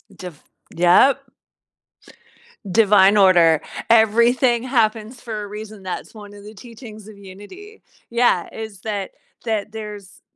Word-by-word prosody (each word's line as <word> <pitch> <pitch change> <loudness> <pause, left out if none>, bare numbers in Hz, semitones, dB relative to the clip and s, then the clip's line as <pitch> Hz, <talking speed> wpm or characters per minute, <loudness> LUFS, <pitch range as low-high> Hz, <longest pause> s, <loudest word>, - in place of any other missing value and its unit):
Just 180 -5 -11 0.3
yep. 180 +11 +4 1.5
Divine 205 -1 +4
order. 175 -5 +4 0.3
Everything 235 +2 +3
happens 230 -2 -1
for 220 -3 -7
a - - -8
reason, 210 0 -10
that's 185 - -7
one 205 -2 -13
of 205 0 -14
the 215 - -11
teachings 220 -2 -13
of 210 - -14
Unity. 205 - -14 0.3
Yeah, 235 -7 +1
is 220 -3 -9
that 205 -3 -5 0.3
that 215 -2 -3
there's, 210 -2 -10
215 Hz, 120 wpm, -20 LUFS, 200-230 Hz, 1.5 s, yep